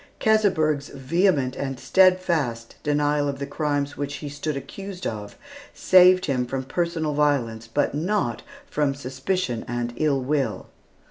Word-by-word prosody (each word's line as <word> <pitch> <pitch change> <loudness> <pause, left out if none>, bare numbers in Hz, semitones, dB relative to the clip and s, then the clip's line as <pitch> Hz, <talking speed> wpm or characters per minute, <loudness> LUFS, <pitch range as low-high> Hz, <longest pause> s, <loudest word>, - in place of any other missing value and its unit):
Keseberg's 160 -10 +2
vehement 140 -1 +1
and 135 -2 -4
steadfast 170 -11 +2
denial 145 0 +1
of 140 - -4
the 140 - -4
crimes 145 -1 -1
of - - -14
which 145 0 -3
he 145 - -6
stood 145 +1 -3
accused 195 +5 -8 0.7
saved 185 0 +6
him 125 -4 -1
from 130 +1 -3
personal 160 +1 -1
violence, 130 -6 0
but 130 +6 0
not 185 +8 -1 0.2
from 145 - 0
suspicion 130 0 -2
and 120 0 -3
ill 150 -3 +2
will. 135 -3 -1
145 Hz, 135 wpm, -24 LUFS, 135-170 Hz, 0.7 s, saved